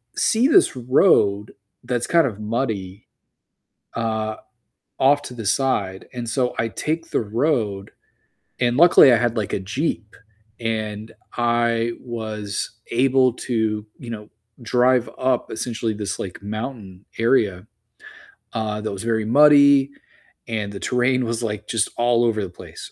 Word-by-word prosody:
see 235 Hz, +4 st, +2 dB
this 350 Hz, -, +4 dB
road 115 Hz, -, +2 dB, 0.3 s
that's 120 Hz, -1 st, -2 dB
kind 165 Hz, -4 st, +4 dB
of 105 Hz, -3 st, -6 dB
muddy, 105 Hz, -4 st, -4 dB, 0.9 s
uh, 110 Hz, -1 st, -2 dB, 0.6 s
off 145 Hz, +2 st, +4 dB
to 125 Hz, -, -9 dB
the 115 Hz, -4 st, -7 dB
side, 100 Hz, -7 st, 0 dB
and 120 Hz, -2 st, -5 dB
so 125 Hz, +1 st, 0 dB
I 115 Hz, -, 0 dB
take 160 Hz, -, -3 dB
the -, -, +1 dB
road, 110 Hz, -3 st, -1 dB, 0.7 s
and 120 Hz, -1 st, +1 dB
luckily 170 Hz, -6 st, +7 dB
I -, -, +5 dB
had, 120 Hz, 0 st, 0 dB
like, 105 Hz, -3 st, -2 dB
a -, -, 0 dB
Jeep 110 Hz, -, -3 dB, 0.4 s
and 110 Hz, -1 st, -4 dB, 0.2 s
I 120 Hz, -1 st, +1 dB
was 110 Hz, -3 st, -5 dB
able 130 Hz, 0 st, +3 dB
to, 110 Hz, -4 st, -2 dB
you 120 Hz, -, -10 dB
know, 105 Hz, -2 st, -7 dB, 0.3 s
drive 125 Hz, +1 st, +2 dB
up 130 Hz, -1 st, 0 dB
essentially 115 Hz, -1 st, -3 dB
this, 105 Hz, -1 st, -4 dB
like, 95 Hz, +1 st, -7 dB
mountain 105 Hz, -3 st, -7 dB
area, 110 Hz, -6 st, +1 dB, 0.9 s
uh, 110 Hz, -2 st, -3 dB
that 110 Hz, -, -4 dB
was 100 Hz, +2 st, -6 dB
very 110 Hz, -2 st, 0 dB
muddy 140 Hz, +2 st, +6 dB, 0.6 s
and 105 Hz, -3 st, -3 dB
the 100 Hz, -, -7 dB
terrain 125 Hz, +2 st, +1 dB
was, 115 Hz, +1 st, -2 dB
like, 105 Hz, -1 st, -4 dB
just 115 Hz, -3 st, 0 dB
all 120 Hz, 0 st, +2 dB
over 110 Hz, -2 st, 0 dB
the 95 Hz, -, -5 dB
place. 90 Hz, -, -11 dB
115 Hz, 140 wpm, -22 LUFS, 105-125 Hz, 0.9 s, luckily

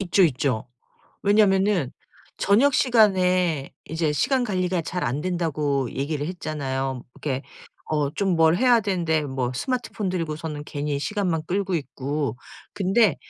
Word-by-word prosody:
있죠, 195 Hz, 0 st, +3 dB
있죠. 130 Hz, -6 st, 0 dB, 0.6 s
왜냐면은 195 Hz, -, +3 dB, 0.5 s
저녁 245 Hz, +8 st, +4 dB
시간에 185 Hz, -, +3 dB
이제 160 Hz, -1 st, -1 dB
시간 250 Hz, -, +1 dB
관리가 185 Hz, -5 st, 0 dB
잘 180 Hz, +2 st, -3 dB
안 130 Hz, +5 st, -1 dB
된다고 150 Hz, -7 st, -1 dB
얘기를 145 Hz, +2 st, -2 dB
했잖아요. 135 Hz, -7 st, -3 dB
이렇게 135 Hz, -3 st, -3 dB, 0.5 s
어 150 Hz, -2 st, +1 dB
좀 195 Hz, -3 st, +1 dB
뭘 160 Hz, 0 st, +5 dB
해야 245 Hz, +1 st, +5 dB
되는데 175 Hz, -7 st, 0 dB
뭐 130 Hz, -3 st, -2 dB
스마트폰 235 Hz, -, -2 dB
들고서는 155 Hz, -3 st, -3 dB
괜히 145 Hz, -1 st, -3 dB
시간만 180 Hz, -1 st, -1 dB
끌고 190 Hz, 0 st, 0 dB
있고. 140 Hz, -4 st, -3 dB, 0.4 s
근데 195 Hz, -1 st, +3 dB
165 Hz, 285 characters per minute, -24 LUFS, 145-195 Hz, 0.6 s, 뭘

